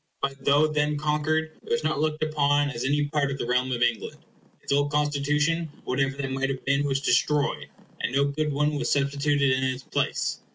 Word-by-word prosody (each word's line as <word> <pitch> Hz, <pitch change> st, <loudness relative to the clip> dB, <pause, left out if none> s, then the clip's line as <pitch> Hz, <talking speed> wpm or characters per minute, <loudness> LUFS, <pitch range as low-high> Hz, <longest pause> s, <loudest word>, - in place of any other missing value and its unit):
But 135 Hz, 0 st, -3 dB
though 145 Hz, +2 st, +5 dB
then 150 Hz, -1 st, 0 dB
conquered, 155 Hz, +1 st, -1 dB
it -, -, -14 dB
was 155 Hz, 0 st, 0 dB
not 155 Hz, -2 st, 0 dB
looked 155 Hz, 0 st, 0 dB
upon 145 Hz, -2 st, +2 dB
as 120 Hz, -2 st, -4 dB
any 145 Hz, +2 st, +1 dB
part 145 Hz, -1 st, 0 dB
of 140 Hz, -, -3 dB
the -, -, -3 dB
realm 125 Hz, +1 st, 0 dB
of 120 Hz, -1 st, 0 dB
England. 120 Hz, -2 st, -1 dB, 0.5 s
Its -, -, -6 dB
old 145 Hz, +1 st, +2 dB
Constitution, 150 Hz, +3 st, +1 dB
whatever 135 Hz, +1 st, -1 dB
that 135 Hz, -1 st, -3 dB
might 135 Hz, +1 st, -1 dB
have 130 Hz, -1 st, -5 dB
been, 140 Hz, +2 st, +2 dB
was 135 Hz, -1 st, 0 dB
destroyed, 145 Hz, +3 st, +1 dB, 0.3 s
and -, -, -1 dB
no 140 Hz, +2 st, +2 dB
good 150 Hz, +2 st, -1 dB
one 150 Hz, +1 st, 0 dB
was -, -, -1 dB
substituted 140 Hz, 0 st, +1 dB
in 130 Hz, +1 st, +1 dB
its 130 Hz, 0 st, -2 dB
place. -, -, -1 dB
145 Hz, 205 wpm, -26 LUFS, 135-150 Hz, 0.5 s, though